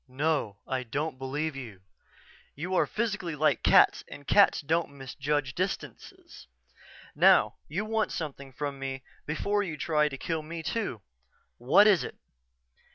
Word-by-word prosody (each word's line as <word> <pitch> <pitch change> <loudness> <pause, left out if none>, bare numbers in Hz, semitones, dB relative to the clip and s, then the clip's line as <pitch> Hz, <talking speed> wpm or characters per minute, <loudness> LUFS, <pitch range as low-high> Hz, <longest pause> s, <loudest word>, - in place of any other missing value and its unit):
"No, 135 -5 -1
I 130 -1 -1
don't 135 +3 -3
believe 145 +3 -3
you. 115 -9 -9 0.7
You 175 +6 -4
are - - +3
physically 210 -7 -2
like 155 +1 +2
cats - - +5
and 145 - -11
cats 200 - +5
don't 165 +3 0
misjudge 140 0 -3
distances. 185 +2 -6 0.7
Now, - - +5
you 195 +7 -3
want 220 0 0
something 140 -4 -6
from 140 +1 -5
me 135 -1 -5 0.2
before 200 +7 0
you 165 -6 -4
try 150 -1 +1
to 135 - -7
kill 160 +4 -2
me, 165 +1 -7
too. 175 - -3 0.6
What 135 - +6
is 195 -9 +5
it?" - - -7
150 Hz, 145 wpm, -28 LUFS, 135-170 Hz, 0.7 s, What